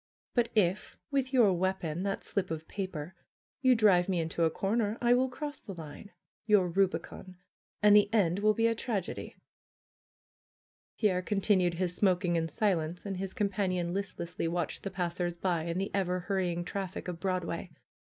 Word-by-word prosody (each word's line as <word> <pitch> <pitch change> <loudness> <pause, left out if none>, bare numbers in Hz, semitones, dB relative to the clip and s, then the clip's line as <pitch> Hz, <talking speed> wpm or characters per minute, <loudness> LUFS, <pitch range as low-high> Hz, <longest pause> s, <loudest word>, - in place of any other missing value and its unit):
But 240 -2 +2
if, 195 -1 +1
with 270 -2 0
your 235 -8 +5
weapon, 180 -2 -1
that 195 0 -2
slip 190 -3 -2
of 160 0 -5
paper, 185 -4 -5 0.5
you 260 -2 +5
drive 195 -5 +4
me 180 -2 +1
into 165 +1 0
a - - +3
corner, 210 +4 0
I 240 0 +4
will 255 +1 +3
cross 290 +3 -6
the 195 - -9
line, 160 +4 -9 0.4
your 205 -4 +5
rubicon, 185 0 -1 0.5
and 210 0 +7
the 205 0 +5
end 195 -5 +2
will 215 +1 +3
be 230 - +2
a 230 - +4
tragedy." 220 -5 -4 1.6
Pierre 190 -5 +2
continued 185 -3 +2
his 180 0 -1
smoking 180 -3 +2
in 165 -1 +1
silence 170 -1 -1
and 195 -2 -3
his 190 0 -5
com 205 -2 +1
panion 185 -3 -1
listlessly 185 -3 -3
watched 170 -1 -2
the 195 - -4
passers 175 -1 -2
by 170 -3 0
and 170 +1 -2
the 195 - -3
ever 180 -2 0
hurrying 180 -2 -1
traffic 190 0 -4
of 175 -2 -5
Broadway. 180 -1 -2
185 Hz, 170 wpm, -30 LUFS, 175-205 Hz, 1.6 s, and